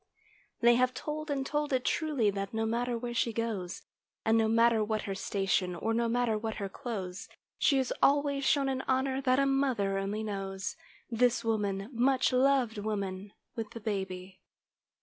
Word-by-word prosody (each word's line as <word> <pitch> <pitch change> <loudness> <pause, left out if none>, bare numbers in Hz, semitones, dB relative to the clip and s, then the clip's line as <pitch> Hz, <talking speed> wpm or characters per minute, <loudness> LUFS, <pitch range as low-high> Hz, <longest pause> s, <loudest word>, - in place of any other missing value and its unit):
They 240 0 +7
have 255 0 +2
told, 305 +2 -4
and 275 -2 -1
told 295 +1 -1
it 255 -1 0
truly, 285 -10 +1
that 195 +1 -4
no 225 0 0
matter 240 +2 -1
where 240 0 -4
she 230 0 +1
goes; 210 -5 -3 0.4
And 220 - +4
no 225 -1 +3
matter 230 0 +4
what 215 0 -1
her 195 - -3
station, 195 -2 0
or 225 +6 -1
no 235 +1 +1
matter 235 -2 +1
what 220 0 -3
her 200 -2 -3
clothes, 190 -4 -6 0.3
She 275 - +4
is 260 -2 0
always 280 0 +3
shown 275 0 +3
an 265 -1 -1
honor 265 +1 +1
that 255 -1 +3
a 275 - +3
mother 255 -8 +1
only 205 +3 -2
knows— 195 -1 -4 0.4
This 240 +1 +2
woman, 200 -3 -1
much 255 +2 +2
loved 255 -4 +3
woman, 200 -2 -3 0.2
with 225 -2 -4
the 230 - -6
baby. 190 -3 -4
230 Hz, 175 wpm, -30 LUFS, 200-260 Hz, 0.4 s, They